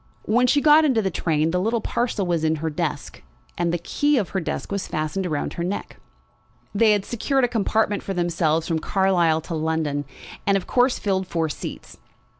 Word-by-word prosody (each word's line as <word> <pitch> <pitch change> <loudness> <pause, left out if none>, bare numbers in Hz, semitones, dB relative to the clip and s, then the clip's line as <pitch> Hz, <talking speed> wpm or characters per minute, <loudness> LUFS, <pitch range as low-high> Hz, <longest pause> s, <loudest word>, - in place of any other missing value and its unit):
When 245 +3 +2
she 285 +3 +3
got 305 +1 +6
into 255 -8 +2
the 190 - 0
train 160 -1 0
the 180 - +1
little 225 +4 +1
parcel 225 -3 -1
was 170 -3 0
in 160 0 +2
her 160 +1 -3
desk, 150 - -4 0.3
and 170 -1 0
the 175 - 0
key 290 - +1
of 205 -7 0
her 190 - -1
desk 170 - -4
was 200 -1 -2
fastened 155 +5 -2
round 150 -4 -2
her 170 - -4
neck. 190 +4 -4 0.8
They 215 +1 +4
had 205 -2 0
secured 265 +3 0
a - - +4
compartment 220 -2 0
for 195 - -5
themselves 165 -2 0
from 165 -1 0
Carlisle 175 -4 +2
to 165 - -7
London, 155 -2 -1 0.4
and 200 0 +4
of 185 - -5
course 250 0 +2
filled 190 -2 -1
four 165 -2 -1
seats. - - -8
190 Hz, 200 wpm, -23 LUFS, 160-220 Hz, 0.8 s, got